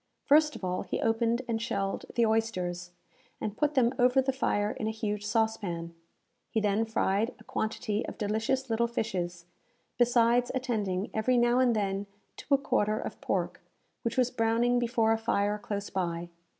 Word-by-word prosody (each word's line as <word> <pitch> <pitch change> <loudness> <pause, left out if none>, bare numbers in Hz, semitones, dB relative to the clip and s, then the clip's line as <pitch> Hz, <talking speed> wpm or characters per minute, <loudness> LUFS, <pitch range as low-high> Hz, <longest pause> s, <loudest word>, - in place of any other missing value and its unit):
First 300 +1 +5
of - - -9
all, 180 0 -1
he - - -3
opened 230 +2 +1
and 225 -1 -1
shelled 200 -5 -2
the 235 - +4
oysters, 185 -6 -1 0.5
and 210 -1 -3
put 300 +3 0
them 245 -1 +4
over 250 +2 +5
the 265 0 +1
fire 210 -5 0
in 220 - -4
a - - +1
huge 210 -2 -3
saucepan. 205 -6 -1 0.6
He 220 - 0
then 210 +1 +1
fried 220 0 0
a 220 - -16
quantity 220 0 -2
of - - -7
delicious 220 +5 0
little 235 0 +1
fishes, 180 -7 -3 0.5
besides 240 0 +4
attending, 210 -7 -1
every 245 +3 +2
now 240 +1 +4
and 250 -3 +4
then, 200 -1 -1 0.3
to 280 - +2
a - - +3
quarter 215 -6 +1
of - - -6
pork, - - -2 0.4
which 230 +1 -3
was 250 -1 +3
browning 235 +1 +2
before 230 -2 +2
a 225 - +2
fire 210 -2 0
close 205 -1 -4
by. 175 -2 -2
225 Hz, 170 wpm, -29 LUFS, 205-240 Hz, 0.6 s, First